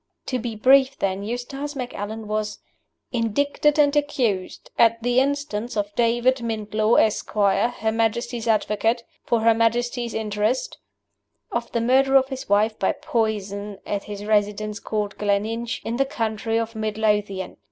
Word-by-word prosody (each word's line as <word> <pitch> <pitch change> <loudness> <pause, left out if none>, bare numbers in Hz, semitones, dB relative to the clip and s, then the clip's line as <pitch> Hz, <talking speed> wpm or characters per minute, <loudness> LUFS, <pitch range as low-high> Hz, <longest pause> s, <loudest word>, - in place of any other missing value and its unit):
To 255 - -2
be 235 -1 -4
brief, 265 +4 +4
then, 195 0 -1
Eustace 245 +7 -5
Macallan 220 -4 -5
was 215 0 -2 0.5
"indicted 285 +6 +1
and 290 -1 +4
accused, 255 -10 -1
at 230 0 +4
the 245 +1 +3
instance 265 -5 -1
of 205 0 -1
David 240 +3 +2
Mintlaw, 220 -2 0
Esquire, 210 -1 +2
Her 220 -2 -2
Majesty's 230 +1 -1
Advocate, 225 +2 +1 0.2
for 235 -2 +1
Her 230 0 +5
Majesty's 240 +1 0
interest," 215 +3 -1 0.7
of 235 0 -3
the 235 - 0
Murder 265 +3 +3
of 265 0 +5
his 265 -5 -6
Wife 215 +2 +2
by 190 - +2
poison, 205 -3 -2
at 200 -1 -3
his 205 -1 -7
residence 210 0 0
called 210 -2 -3
Gleninch, 215 +3 -1
in 230 +1 -2
the 275 - +3
county 225 -3 -2
of 230 0 -2
Mid 215 -1 -3
Lothian. 210 -3 0
225 Hz, 145 wpm, -23 LUFS, 210-245 Hz, 0.7 s, Her